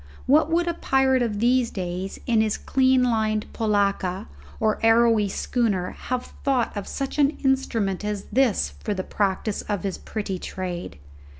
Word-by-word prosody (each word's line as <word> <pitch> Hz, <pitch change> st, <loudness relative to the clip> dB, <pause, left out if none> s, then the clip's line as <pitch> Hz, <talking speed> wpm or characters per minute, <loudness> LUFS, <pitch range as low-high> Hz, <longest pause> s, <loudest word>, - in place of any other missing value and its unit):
What 300 Hz, +5 st, +4 dB
would 340 Hz, +1 st, +1 dB
a 340 Hz, -, +1 dB
pirate 265 Hz, -4 st, +2 dB
of 225 Hz, -4 st, -1 dB
these 240 Hz, +2 st, +2 dB
days, 185 Hz, 0 st, -4 dB
in 230 Hz, -2 st, +3 dB
his 215 Hz, -1 st, 0 dB
clean 260 Hz, -1 st, +3 dB
lined 220 Hz, -3 st, +1 dB
polacca 200 Hz, -4 st, 0 dB, 0.3 s
or 215 Hz, -1 st, +1 dB
arrowy 225 Hz, -2 st, +4 dB
schooner, 200 Hz, -4 st, -1 dB
have 255 Hz, 0 st, -5 dB
thought 260 Hz, -5 st, +1 dB
of 205 Hz, -2 st, -4 dB
such 275 Hz, +1 st, -4 dB
an 285 Hz, +1 st, +3 dB
instrument 225 Hz, -8 st, 0 dB
as 210 Hz, -1 st, -3 dB
this 250 Hz, -1 st, +2 dB
for 210 Hz, -, -1 dB
the 185 Hz, -, -3 dB
practice 200 Hz, +1 st, -1 dB
of 205 Hz, -4 st, -3 dB
his 195 Hz, -2 st, -3 dB
pretty 200 Hz, -4 st, -4 dB
trade? 175 Hz, -, -5 dB
220 Hz, 160 wpm, -24 LUFS, 200-255 Hz, 0.3 s, What